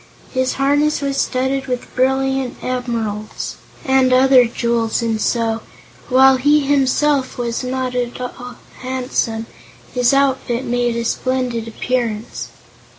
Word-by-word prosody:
His 260 -1 +1
harness 290 +2 +2
was 275 -1 -2
studded 265 +1 0
with 250 -1 -4
brilliant 265 0 +1
emeralds 230 -4 -3 0.3
and 265 -1 +3
other 255 -1 +6
jewels 235 0 0
and 225 -2 -1
so, 230 -1 0 0.5
while 265 +1 +6
he 295 +3 +4
himself 275 0 +1
was 235 0 -2
not 255 0 -2
at 245 -1 -2
all 250 0 -7 0.2
handsome, 250 -3 -2 0.5
his 245 -1 +3
outfit 265 -3 +1
made 240 -1 0
a 235 0 -2
splendid 250 -2 -1
appearance. 230 -1 -3
255 Hz, 120 wpm, -19 LUFS, 235-265 Hz, 0.5 s, other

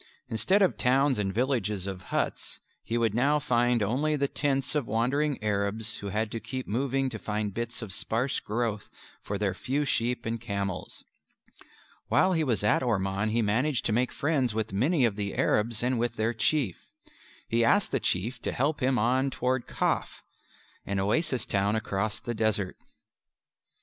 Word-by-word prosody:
Instead 190 - +3
of 185 - +1
towns 135 0 +3
and 95 -2 0
villages 105 -4 0
of 95 -2 -5
huts, - - -2 0.2
he 115 - -2
would 115 -3 +1
now 140 +6 +3
find 120 -5 +2
only 140 +9 +1
the 140 -1 +1
tents 135 -1 -1
of 145 -6 0
wandering 135 +6 +1
Arabs 105 +2 -1
who 100 - -6
had 105 +2 -1
to 115 - -3
keep 130 +2 -5
moving 135 +4 0
to 115 -4 -5
find 105 -1 -2
bits 120 +1 -4
of 100 -4 -5
sparse 115 +6 -1
growth 110 -1 -2 0.3
for 100 - -3
their 100 -2 0
few 145 +3 -1
sheep 120 -2 0
and 115 0 -2
camels. 100 -5 -4 1.0
While 185 - +3
he 160 -2 +2
was 120 -8 0
at 105 - +3
Orman 100 -3 0
he 115 +1 +1
managed 120 +7 +1
to 110 - +1
make 125 +3 +1
friends 140 -6 0
with 110 -2 -2
many 130 - +3
of 110 -3 0
the 100 -1 -2
Arabs 115 +1 +1
and 125 -1 +1
with 120 +1 -1
their 110 +2 0
Chief. 115 - 0 0.6
He 115 0 +2
asked 205 - +3
the - - +1
Chief 115 +7 -1
to - - -2
help 145 +4 0
him 130 0 +2
on 130 +4 +2
toward 130 -1 -1
Kaf - - -1 0.6
an 100 0 -2
oasis 120 - +1
town 100 +1 +1
across 110 0 -1
the 120 - -4
desert. 110 -4 0
115 Hz, 175 wpm, -28 LUFS, 105-130 Hz, 1.0 s, Instead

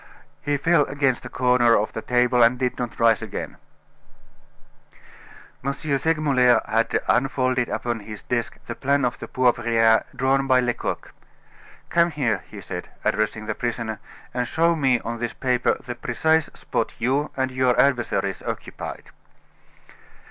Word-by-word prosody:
He 145 0 0
fell 150 +1 +3
against 135 -3 0
a - - -11
corner 125 -2 +3
of 105 - -1
the 110 - -4
table, 125 0 +2
and 120 +2 +5
did 125 -1 -2
not 120 -2 -4
rise 115 -1 +4
again." 110 -3 -6 2.1
M. 140 +1 -1
Segmuller 140 -3 +2
had 115 +1 +1
unfolded 130 -1 +1
upon 120 -1 -2
his 105 0 -9
desk 120 -1 -2
the - - -4
plan 140 0 +1
of 125 - -2
the - - -7
Poivriere 115 -3 +3
drawn 135 +1 +1
by 130 -1 +5
Lecoq. 125 -1 -3 0.8
"Come 170 0 +3
here," 125 - -1
he - - -9
said, - - -7 0.2
addressing 110 +1 0
the 110 - -2
prisoner, 115 -2 -3 0.3
"and 125 0 -1
show 170 +1 +2
me 135 -5 +2
on 115 0 -5
this 120 0 -3
paper 125 -2 +1
the 125 - -4
precise 160 +7 +1
spot - - -3
you 135 +5 0
and 130 0 0
your 130 -1 +2
adversaries 115 -8 +1
occupied." - - -7
125 Hz, 145 wpm, -23 LUFS, 115-135 Hz, 2.1 s, and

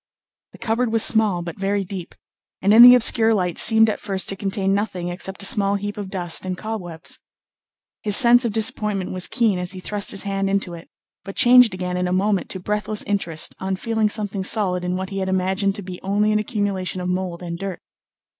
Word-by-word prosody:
The - - -14
cupboard 230 +1 -2
was 225 -1 +4
small 210 -6 +2
but 170 +2 -8
very 200 +1 -1
deep, 185 -2 -9 0.4
and 200 +2 +2
in 225 - +8
the 245 +1 +10
obscure 225 -2 +4
light 180 -4 -1
seemed 225 0 +6
at 215 - -2
first 195 -3 -3
to 195 - 0
contain 195 0 -2
nothing 185 -4 -3
except 190 +2 -4
a - - +1
small 200 0 +2
heap 205 +1 -5
of 205 -3 -7
dust 175 -4 -1
and 185 -1 -4
cobwebs. 180 -7 -7 0.8
His 205 -2 +5
sense 245 0 +6
of 235 - -1
disappointment 210 -3 -1
was 185 -1 -2
keen 220 -6 0
as 180 +1 -5
he 185 - -8
thrust 205 +2 -3
his 195 - -3
hand 195 -1 -2
into 195 -3 -2
it, 170 0 -12 0.3
but 195 - -9
changed 245 -4 +5
again 180 0 -4
in 180 0 -1
a - - -3
moment 195 +1 0
to 190 - -5
breathless 210 +2 -2
interest 170 -6 -1
on 190 0 -3
feeling 220 +1 -1
something 205 -2 -3
solid 185 -3 +1
in 180 0 -2
what 190 0 -5
he 195 - -4
had 190 0 -3
imagined 190 +1 -1
to 205 - -7
be 180 -1 -9
only 205 +2 0
an 215 - +1
accumulation 205 -5 -3
of 180 - -4
mould 180 -1 -4
and 170 -1 -6
dirt. 195 -2 -6
195 Hz, 215 wpm, -21 LUFS, 185-210 Hz, 0.8 s, the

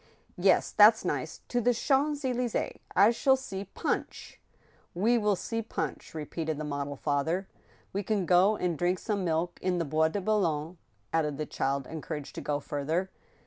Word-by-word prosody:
"Yes, - - +3
that's - - +6
nice. - - -3
To 245 - +1
the 245 +1 +3
Champs 285 +3 +1
Elys^es! 250 -2 -1 0.2
I 200 +4 +7
shall 265 +3 +3
see 200 -7 -6
Punch!" 195 - -4 0.3
*' - - -34
We 230 +7 +3
will 210 -2 +2
see 225 +5 -3
Punch," 220 - -5
repeated 155 0 -3
the 155 - -4
model 145 -1 -3
father. 155 +7 -1 0.2
" - - -32
We 200 - -1
can 205 -2 0
go 185 +5 +5
and 175 -4 -1
drink 180 +1 +2
some 205 0 -2
milk 170 +1 -1
in 185 -1 0
the 170 - 0
Bois 155 +2 +2
de 180 +6 -2
Boulogne," 175 -5 0 0.3
added 150 -3 +1
the 155 - -2
child, 135 -1 -1
encouraged 155 -1 -6
to - - -6
go 145 -1 -1
further. 160 +7 -2
180 Hz, 180 wpm, -29 LUFS, 155-210 Hz, 0.3 s, I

